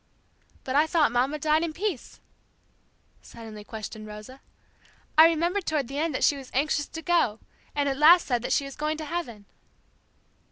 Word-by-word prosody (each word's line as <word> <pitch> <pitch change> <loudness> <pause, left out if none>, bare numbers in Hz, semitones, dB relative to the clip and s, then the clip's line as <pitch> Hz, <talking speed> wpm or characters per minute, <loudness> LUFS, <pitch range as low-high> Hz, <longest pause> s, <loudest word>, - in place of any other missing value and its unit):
'" - - -35
"But 260 - -3
I 300 +2 +4
thought 310 -5 +2
Mamma 255 +5 0
died 305 +1 +2
in 335 -2 -2
peace?" 365 - -4 1.0
suddenly 220 -2 -11
questioned 215 0 -8
Rosa. 215 +6 -11 0.7
"I 315 +1 +9
remember 340 +4 0
toward 305 -7 -2
the 280 +1 -4
end 315 -2 -1
that - - -1
she 290 - +4
was 270 -2 -10
anxious 295 +1 0
to 325 - -8
go, 335 -12 +2 0.4
and 285 -1 0
at 270 -1 -1
last 335 +3 +7
said 245 -4 0
that - - -4
she 280 - +1
was 275 - -9
going 305 +1 -2
to 310 - -6
heaven." 285 -11 -5
290 Hz, 185 wpm, -26 LUFS, 245-320 Hz, 1.0 s, I